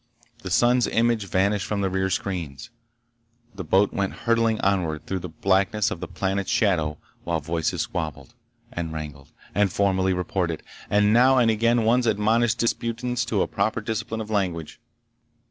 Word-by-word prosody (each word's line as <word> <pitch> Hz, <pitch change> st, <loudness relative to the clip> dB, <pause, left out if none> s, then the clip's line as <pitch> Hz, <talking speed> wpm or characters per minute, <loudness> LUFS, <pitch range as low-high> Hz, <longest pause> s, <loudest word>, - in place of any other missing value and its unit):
The -, -, -6 dB
sun's 120 Hz, +1 st, +3 dB
image 115 Hz, -3 st, +1 dB
vanished 100 Hz, +2 st, +1 dB
from 105 Hz, -1 st, -1 dB
the 95 Hz, -, 0 dB
rear 95 Hz, 0 st, 0 dB
screens. 90 Hz, 0 st, -4 dB, 0.8 s
The 95 Hz, -1 st, -6 dB
boat 100 Hz, +2 st, +2 dB
went 100 Hz, -1 st, -1 dB
hurtling 115 Hz, -1 st, +2 dB
onward 85 Hz, -6 st, 0 dB
through 95 Hz, +3 st, -3 dB
the 90 Hz, 0 st, -7 dB
blackness 95 Hz, +5 st, +1 dB
of -, -, -4 dB
the -, -, -5 dB
planet's 95 Hz, 0 st, -2 dB
shadow 80 Hz, -8 st, +1 dB, 0.3 s
while 85 Hz, -1 st, -1 dB
voices 80 Hz, +1 st, -2 dB
squabbled, 80 Hz, -, -5 dB, 0.4 s
and 85 Hz, -9 st, -4 dB
wrangled, 75 Hz, -3 st, -8 dB, 0.2 s
and 100 Hz, -2 st, +2 dB
formally 95 Hz, -1 st, +1 dB
reported, 90 Hz, -2 st, -2 dB, 0.3 s
and 105 Hz, +1 st, +3 dB
now 130 Hz, +3 st, +5 dB
and 120 Hz, -3 st, +4 dB
again 115 Hz, +2 st, +2 dB
one 120 Hz, +3 st, +4 dB
admonished 110 Hz, +2 st, +2 dB
disputants 120 Hz, +1 st, -1 dB
to 110 Hz, -5 st, +1 dB
a -, -, -3 dB
proper 110 Hz, +3 st, -1 dB
discipline 110 Hz, 0 st, -3 dB
of 110 Hz, 0 st, -7 dB
language. 90 Hz, -6 st, -2 dB
100 Hz, 160 wpm, -24 LUFS, 90-115 Hz, 0.8 s, now